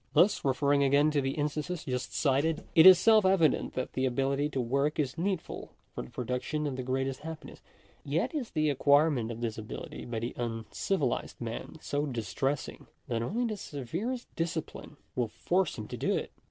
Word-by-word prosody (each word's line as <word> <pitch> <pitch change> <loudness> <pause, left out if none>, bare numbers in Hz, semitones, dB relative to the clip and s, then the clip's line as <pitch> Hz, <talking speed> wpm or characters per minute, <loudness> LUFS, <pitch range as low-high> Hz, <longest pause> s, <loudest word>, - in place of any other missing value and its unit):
Thus, 190 +4 +4
referring 140 +1 +2
again 140 +2 +4
to 145 -2 +2
the 135 0 -1
instances 150 +3 -2
just 125 -1 -3
cited, 150 +3 +1
it 165 0 +9
is 185 -1 +11
self 220 +3 +5
evident 185 -5 +3
that 130 - -3
the 130 0 +1
ability 135 +3 0
to 135 - -3
work 140 +5 0
is 135 -4 -1
needful 180 0 -3 0.2
for - - -4
the 65 - -9
production 125 +5 -2
of 140 -3 -2
the 130 - -3
greatest 130 +1 -1
happiness; 160 0 -8 0.4
yet - - -1
is 280 -7 -3
the 155 -2 +1
acquirement 140 -3 +3
of 115 0 -6
this 115 -2 -2
ability 110 - -7
by 120 -1 -4
the 115 +2 -3
un 115 -2 -3
civilized 150 -11 -1
man 115 +6 -5
so 145 +1 -1
distressing, 135 +3 -3 0.2
that 115 -2 0
only 225 - -1
the 215 -3 -2
severest 185 - -4
discipline 160 -2 -4 0.2
will 120 -2 +1
force 180 - 0
him 110 -2 -6
to - - 0
it. - - -3
140 Hz, 180 wpm, -30 LUFS, 125-160 Hz, 0.4 s, is